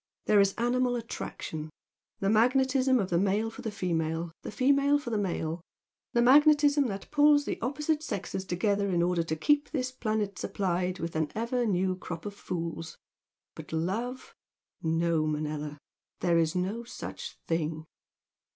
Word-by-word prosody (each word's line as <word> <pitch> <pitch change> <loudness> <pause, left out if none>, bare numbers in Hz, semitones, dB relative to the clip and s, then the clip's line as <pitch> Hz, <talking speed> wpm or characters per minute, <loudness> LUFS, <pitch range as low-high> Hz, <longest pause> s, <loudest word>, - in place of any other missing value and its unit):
There 210 - +5
is 200 -1 +3
animal 245 +1 +1
attraction, 160 -8 -5 0.5
the 195 - +2
magnetism 260 +3 +3
of 195 -6 -1
the 170 - +3
male 205 +4 +1
for 255 - -10
the 230 - -3
female, 165 -4 -2
the - - -6
female 280 +5 +3
for 270 -5 -6
the 220 - +1
male, 170 -4 -2 0.5
the 235 - +4
magnetism 290 +1 +6
that 195 -3 -6
pulls 295 -1 +5
the - - -3
opposite 300 +5 0
sexes 195 - -4
together 200 +2 0
in 175 -2 +2
order 175 -1 +2
to 165 -1 -2
keep 290 - +2
this 255 -4 -2
planet 215 -5 -2
supplied 185 -2 -1
with 165 -1 -5
an 155 -1 0
ever 235 +2 0
new 185 -1 +1
crop 170 -1 -7
of 205 - -4
fools, 165 -4 -5 0.6
but - - -10
love! 220 +11 -3 0.5
No, 165 -1 +1
Manella! 150 -1 -3 0.4
There 170 -1 +3
is 160 0 +1
no 195 +6 -1
such 235 - -7
thing!" 160 -1 -1
200 Hz, 155 wpm, -29 LUFS, 170-250 Hz, 0.6 s, magnetism